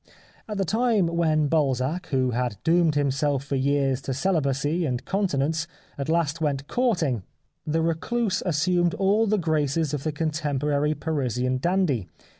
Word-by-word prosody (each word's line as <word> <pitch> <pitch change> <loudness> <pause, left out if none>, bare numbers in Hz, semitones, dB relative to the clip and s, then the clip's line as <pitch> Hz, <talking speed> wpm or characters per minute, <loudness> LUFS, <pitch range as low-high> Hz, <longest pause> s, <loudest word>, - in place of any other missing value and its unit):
At 210 - -3
the 195 - 0
time 220 -1 +2
when 165 -2 +1
Balzac, 145 +3 0
who 130 -2 +1
had 120 -3 -2
doomed 165 -2 +3
himself 140 -1 +1
for 140 0 -3
years 135 -1 +1
to 135 -1 -3
celibacy 150 0 0
and 125 -6 -2
con 195 +1 0
tinence, 160 +2 -1 0.3
at 140 +1 -4
last 165 -1 0
went 140 -2 -1
courting, 175 - 0 0.5
the 160 +2 +1
recluse 190 +6 0
as 170 -5 -1
sumed 175 +1 +2
all 205 +3 +2
the 215 +1 +2
graces 155 -3 0
of 145 - -2
the 155 - -1
contemporary 150 -1 -1
Parisian 130 -5 -1
dandy. 160 - 0
155 Hz, 155 wpm, -25 LUFS, 135-175 Hz, 0.5 s, doomed